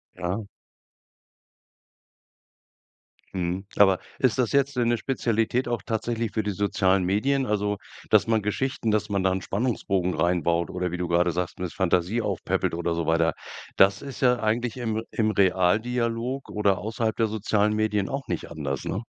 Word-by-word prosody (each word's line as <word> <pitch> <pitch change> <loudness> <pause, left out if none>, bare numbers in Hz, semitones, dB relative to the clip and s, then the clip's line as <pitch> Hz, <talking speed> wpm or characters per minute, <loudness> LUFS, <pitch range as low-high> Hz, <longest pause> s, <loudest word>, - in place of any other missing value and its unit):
Ja. 95 +4 -3 2.9
Mhm, 90 +1 -2
aber 95 -2 +5 0.2
ist 130 -2 +2
das 125 -3 +1
jetzt 140 -1 +2
'ne 120 - +2
'ne 120 0 +3
Spezialität 120 0 0
auch 120 -1 -2
tatsächlich 115 0 -2
für 110 - 0
die 105 - -2
sozialen 95 -1 +2
Medien? 130 +9 +1
Also, 105 -1 0 0.3
dass - - +5
man 115 -1 +2
Geschichten 115 +3 -1
dass 105 0 0
man 100 -1 +1
da 95 0 +2
'n 95 0 -2
Spannungsbogen 100 -5 -1
rein 85 +2 +1
baut 85 +2 +1
oder 90 0 -2
wie 90 - -3
du 90 -1 -3
grade 85 +1 +3
sagst, 90 +2 -3
mit 90 -2 -3
Fantasie 95 +4 +1
aufpäppelt 100 -5 -1
oder 85 0 -1
so 85 -1 -2
weiter. 80 0 +2 0.4
Das 95 +1 +5
ist 135 -3 -8
ja 125 -2 +4
eigentlich 115 +2 0
im 110 -2 -2
im 110 -1 +1
Realdialog 115 +7 +1
oder 100 -2 +1
außerhalb 110 +1 -2
der 115 - +2
sozialen 105 0 +1
Medien 105 -2 0
auch 135 -1 -4
nicht - - -3
anders, 70 -4 -4
ne? 100 +5 -2
105 Hz, 165 wpm, -25 LUFS, 90-115 Hz, 2.9 s, aber